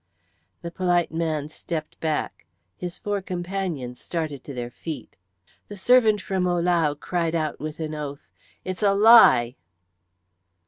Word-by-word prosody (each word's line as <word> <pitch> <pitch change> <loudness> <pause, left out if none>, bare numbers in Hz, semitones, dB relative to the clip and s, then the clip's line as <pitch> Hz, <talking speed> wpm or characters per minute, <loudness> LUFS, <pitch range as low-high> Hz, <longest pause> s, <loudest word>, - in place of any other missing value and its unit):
The 170 - -5
polite 175 -1 +1
man 160 -3 -2
stepped 155 0 -6
back; 155 - -3 0.3
his 175 - -6
four 205 -1 -2
companions 175 -9 -4
started 155 -6 -4
to - - -7
their 120 -1 -5
feet. 150 -1 -8 0.5
The 205 - -9
servant 220 -1 +4
from 185 -2 -1
Ohlau 170 -4 +1
cried 170 -1 -1
out 155 -2 -2
with 155 +1 -6
an 155 -1 -4
oath, 145 -1 -7 0.3
"It's 185 +1 -4
a 200 -1 +3
lie." 200 - +7
170 Hz, 135 wpm, -24 LUFS, 150-185 Hz, 0.5 s, lie